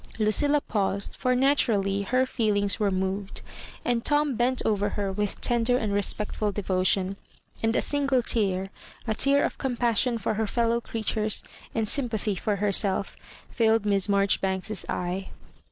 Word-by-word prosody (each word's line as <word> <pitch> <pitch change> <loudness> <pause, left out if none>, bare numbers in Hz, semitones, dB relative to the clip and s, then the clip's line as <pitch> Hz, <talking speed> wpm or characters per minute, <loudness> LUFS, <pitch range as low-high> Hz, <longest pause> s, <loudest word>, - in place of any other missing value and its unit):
Lucilla 285 +7 +2
paused, 200 -3 -2
for 255 0 0
naturally 225 -7 +2
her 255 +6 +1
feelings 210 -4 +1
were 210 -2 +2
moved; 190 +1 -3 0.4
and 240 -1 0
Tom 295 -1 +2
bent 250 +2 +1
over 205 -1 +1
her 200 -1 -2
with 205 +1 -2
tender 240 +1 +2
and 215 -4 -2
respectful 205 +1 0
devotion; 190 -1 0 0.4
and 225 +1 +1
a - - +2
single 275 -3 +2
tear 195 -4 0 0.2
— - - -21
a 220 - +1
tear 280 +5 +3
of - - -5
compassion 240 -2 +1
for 225 - -2
her 215 0 -1
fellow 235 +2 0
creatures 215 -2 -1 0.3
and 220 -1 0
sym 255 +2 +1
pathy 215 -2 -1
for 205 +3 -1
herself— 200 -1 0 0.4
filled 225 -2 +2
Miss 200 -1 +1
Marjoribanks's 195 0 +1
eye. 180 +2 -3
215 Hz, 155 wpm, -26 LUFS, 200-240 Hz, 0.4 s, tear